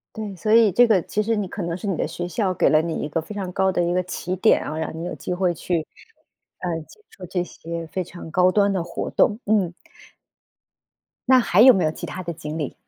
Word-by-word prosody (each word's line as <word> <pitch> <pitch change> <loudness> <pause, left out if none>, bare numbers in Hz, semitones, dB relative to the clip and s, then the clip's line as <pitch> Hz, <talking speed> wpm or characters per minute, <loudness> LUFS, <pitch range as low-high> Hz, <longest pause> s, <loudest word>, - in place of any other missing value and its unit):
对， 210 -3 -5
所 215 +5 -2
以 225 -2 +6
这 245 +6 +5
个 210 -5 +4
其 210 - -1
实 225 +2 0
你 205 -2 -2
可 200 - -6
能 170 -1 -3
是 200 - -8
你 195 - 0
的 - - -1
学 175 +2 -5
校 190 0 -1
给 - - +3
了 155 - +4
你 165 0 -3
一 150 - -4
个 160 +2 -1
非 205 +6 -9
常 190 -3 -4
高 190 +1 +1
的 180 - 0
一 175 +1 0
个 180 - +2
起 180 0 -4
点 200 +4 +3
啊， 155 - -5
让 160 0 -4
你 165 - -5
有 175 - -4
机 - - -4
会 180 -1 +1
去， 165 0 -2 0.7
呃， 180 - -3 0.2
接 - - -18
受 185 - -11
这 180 +1 -1
些 170 -1 -7
非 185 +3 -3
常 175 -1 -10
高 180 +2 +4
端 200 0 +3
的 190 -3 -1
活 - - -5
动， 210 - +2
嗯。 200 -5 +1 1.6
那 260 -1 +7
还 200 -6 +2
有 255 +2 +9
没 190 - +1
有 155 - +1
其 - - -7
他 185 - -6
的 170 - -4
经 155 -1 -6
历？ 150 -4 -3
180 Hz, 270 characters per minute, -23 LUFS, 170-205 Hz, 1.6 s, 有